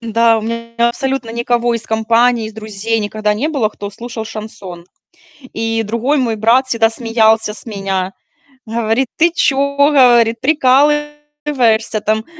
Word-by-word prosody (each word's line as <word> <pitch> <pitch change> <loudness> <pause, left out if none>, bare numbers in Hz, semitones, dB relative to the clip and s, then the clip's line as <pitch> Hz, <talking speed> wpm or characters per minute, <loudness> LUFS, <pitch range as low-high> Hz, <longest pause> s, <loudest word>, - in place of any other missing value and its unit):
да, 230 0 +2
у - - -4
меня 230 +1 -2
абсолютно 265 -1 -3
никого 235 0 0
из 230 - -3
компании, 230 +1 +1
из - - -11
друзей 220 +1 -3
никогда 210 0 -1
не 260 +9 -2
было, 275 -9 0
кто 205 -1 -8
слушал 230 +2 -7
шансон. 215 -5 -9 0.7
И 225 0 -1
другой 235 +7 -1
мой 235 -4 0
брат 235 +5 +2
всегда 225 -3 +2
смеялся 225 -2 +1
с - - -9
меня, 195 -3 -3 0.5
говорит: 230 +3 -1
"Ты 335 +1 +3
чё,- 280 -3 0
говорит- 245 -6 +4
прикалываешься, 295 -5 +1
там?" 220 +1 -1
230 Hz, 140 wpm, -16 LUFS, 220-260 Hz, 0.7 s, говорит